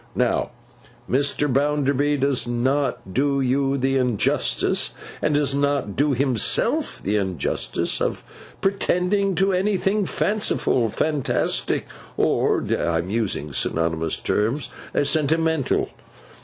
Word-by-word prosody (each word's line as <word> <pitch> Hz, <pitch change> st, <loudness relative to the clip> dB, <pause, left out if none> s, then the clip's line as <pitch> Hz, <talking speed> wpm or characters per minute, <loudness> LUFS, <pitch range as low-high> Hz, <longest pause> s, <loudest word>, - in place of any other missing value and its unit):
Now, -, -, +1 dB, 0.6 s
Mr. 140 Hz, +2 st, +1 dB
Bounderby 145 Hz, +1 st, +1 dB
does 135 Hz, -2 st, +1 dB
not 125 Hz, -4 st, -1 dB
do 140 Hz, +3 st, +1 dB
you 135 Hz, +1 st, +1 dB
the 135 Hz, +1 st, +1 dB
injustice, 125 Hz, -5 st, 0 dB, 0.3 s
and 150 Hz, -, +1 dB
does 145 Hz, -2 st, +2 dB
not 140 Hz, -7 st, 0 dB
do 145 Hz, +1 st, +2 dB
himself 130 Hz, -4 st, +1 dB
the 105 Hz, +2 st, +1 dB
injustice, 95 Hz, -7 st, -2 dB
of -, -, -1 dB, 0.4 s
pretending 195 Hz, 0 st, +1 dB
to 195 Hz, +3 st, +2 dB
anything 195 Hz, +1 st, +1 dB
fanciful, 205 Hz, -, +1 dB
fantastic, 150 Hz, +4 st, 0 dB, 0.3 s
or -, -, +1 dB
(I 85 Hz, -1 st, 0 dB
am 85 Hz, +3 st, -3 dB
using 100 Hz, -10 st, -2 dB
synonymous 80 Hz, +1 st, -1 dB
terms) 115 Hz, +8 st, -1 dB, 0.3 s
sentimental. 160 Hz, 0 st, +1 dB
140 Hz, 105 wpm, -23 LUFS, 120-150 Hz, 0.6 s, does